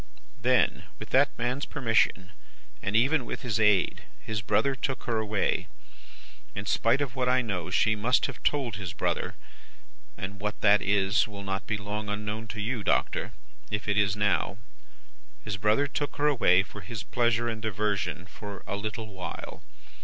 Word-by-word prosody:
"'Then, - - +2
with - - -9
that 140 +2 +5
man's 125 +4 -1
permission 115 -7 +1 0.5
and 95 - -2
even 135 +5 +4
with - - -6
his 110 -4 0
aid, 105 -3 +3 0.2
his 110 -2 -3
brother 135 +7 +2
took 135 0 -3
her 115 -2 0
away; 105 -2 0 0.9
in 100 - -4
spite 115 +5 +2
of 135 -3 -2
what 125 -1 +1
I 130 0 +3
know 90 -7 -3
she 110 -1 +3
must 115 +5 +2
have - - -5
told 130 -9 0
his 90 -5 -5
brother - - -1 0.8
and 95 +1 -6
what 105 +1 -2
that 105 -1 +6
is, 100 +2 +3
will 100 -2 -8
not 95 +1 -3
be 110 - 0
long 105 +1 -4
unknown 105 +2 -3
to 110 0 -6
you, 110 +1 -2
Doctor, - - +1 0.4
if 105 0 -3
it 105 - +2
is 100 -2 +3
now 105 -1 +1 0.9
his 105 -1 -3
brother 105 +7 +3
took 145 +1 -3
her 145 - 0
away 110 -11 +5
for 110 +3 -10
his 115 -3 -6
pleasure 120 0 +1
and 110 -2 -3
diversion, 105 -4 -1
for 100 0 -9
a - - -3
little 110 +2 -4
while. 95 -1 -6
105 Hz, 170 wpm, -28 LUFS, 100-120 Hz, 0.9 s, that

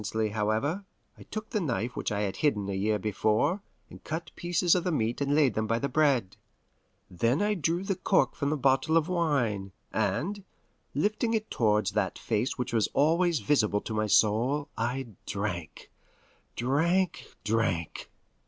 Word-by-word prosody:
Presently, 110 +1 -1
however, 110 - -1 0.3
I - - -17
took 215 0 -7
the 215 - 0
knife 125 -6 -2
which - - -2
I 105 0 -1
had 100 -2 -2
hidden 105 -10 +1
a - - -2
year 105 +3 +1
before, 110 - +1 0.3
and - - -14
cut 165 +2 -5
pieces 175 0 +2
of 180 - +2
the 180 - 0
meat 120 -4 -1
and 140 +1 +1
laid 145 -6 +4
them 110 0 -1
by 115 +1 +1
the 140 - -1
bread. 135 -8 +1 0.7
Then 115 - +1
I 210 +1 +2
drew 170 0 0
the 195 -1 -1
cork 185 - +2
from 140 - -2
the 155 - 0
bottle 135 +4 +3
of 160 -1 +2
wine, 125 - 0 0.2
and, 150 - -1 0.5
lifting 215 - +1
it 215 0 -3
towards 105 -3 +2
that 105 - -1
face 115 +4 -1
which 125 -2 -3
was 110 -3 +3
always 165 +2 +3
visible 105 -8 +2
to 110 - -5
my 110 0 0
soul, 120 +9 +2
I 125 +4 -2 0.2
drank 100 -5 -4 0.6
drank 165 +9 +1 0.2
drank! 105 -7 -1
130 Hz, 170 wpm, -28 LUFS, 110-165 Hz, 0.7 s, laid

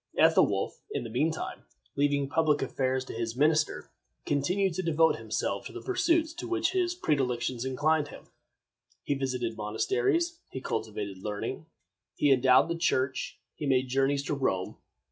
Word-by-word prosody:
Ethelwolf, - - +3
in - - -3
the 115 - -7
mean 150 +8 +2
time, 160 - -6 0.3
leaving 140 -1 +1
public 155 0 +2
affairs 130 -1 -1
to - - -7
his 115 0 -3
minister, 155 +2 +1 0.3
continued 180 +7 +1
to 185 - -2
devote 165 -2 +3
himself - - -2
to - - -11
the - - -7
pursuits 335 -4 +1
to 350 +1 -6
which 355 0 +1
his 360 -2 0
predilections 130 - -1
inclined 145 +3 +1
him. - - -11 0.8
He - - 0
visited 125 -4 -2
monasteries; 120 - 0
he 130 - -5
cultivated 105 -6 -4
learning; 105 +1 -4 0.5
he 145 - +3
endowed 130 +1 +5
the 170 - -1
Church; 130 -6 0 0.2
he 150 - -5
made 130 -1 +2
journeys 135 +2 +1
to 145 - -2
Rome. 95 -10 -1
140 Hz, 155 wpm, -29 LUFS, 125-165 Hz, 0.8 s, endowed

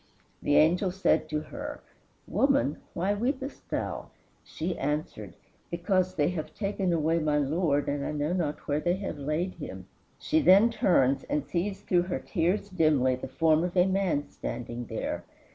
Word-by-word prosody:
The 145 - +2
angel 175 +5 +4
said 190 +2 +1
to 150 0 -1
her, 290 - -7 0.5
"Woman, 270 - +2 0.2
why 190 +4 +1
weepest 260 +6 -3
thou? - - -3 0.4
She 170 +3 -4
answered, 135 - -3 0.3
Because 185 +1 0
they 145 -2 +2
have 165 -4 -5
taken 195 -3 -1
away 165 0 +2
my 150 -2 +1
Lord, 145 0 +1
and 140 0 -1
I - - -2
know 150 +2 -1
not 155 -5 -2
where 145 +1 +1
they 175 +3 +1
have 190 -6 -5
laid 155 +6 -1
him." - - -8 0.3
She 315 +1 +1
then 205 +1 +6
turns 140 - +3
and 150 -1 -1
sees 190 +3 -2
through 180 -3 +2
her - - 0
tears 185 +3 0
dimly 155 -9 +3
the 130 +1 -5
form 160 +3 +2
of 180 +1 -3
a 180 - +6
man 190 -6 0
standing 120 0 -5
there. 110 - -4
170 Hz, 165 wpm, -28 LUFS, 150-190 Hz, 0.5 s, then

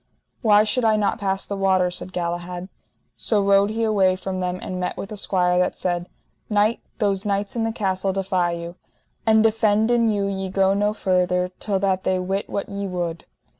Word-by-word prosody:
Why 210 -2 +5
should 250 +3 0
I 220 -1 +4
not 210 -1 0
pass 195 -1 -1
the 200 - -4
water? 190 -2 +2
said 180 +1 -6
Galahad. 175 +1 -4 0.5
So 215 - +1
rode 200 0 +4
he 225 +1 -2
away 195 -4 +3
from 185 0 -4
them 180 0 -2
and 185 -1 -5
met 180 - -3
with 200 - -6
a - - -4
squire 180 -3 +2
that 180 - 0
said: 175 -1 -2 0.4
Knight, 210 +2 +2 0.2
those 200 -4 0
knights 200 0 -2
in 225 -1 0
the 225 - 0
castle 195 -3 -1
defy 185 -2 0
you, 170 +1 -7 0.5
and 220 0 +5
defenden 225 +1 +3
you 205 -2 0
ye 195 -1 -3
go 195 0 +2
no 205 +1 0
further 180 -2 +1
till 200 -2 0
that 190 -1 +1
they 185 - +1
wit 190 +2 -2
what 200 - -3
ye 200 0 -4
would. 175 -3 -4
195 Hz, 195 wpm, -23 LUFS, 180-210 Hz, 0.5 s, Why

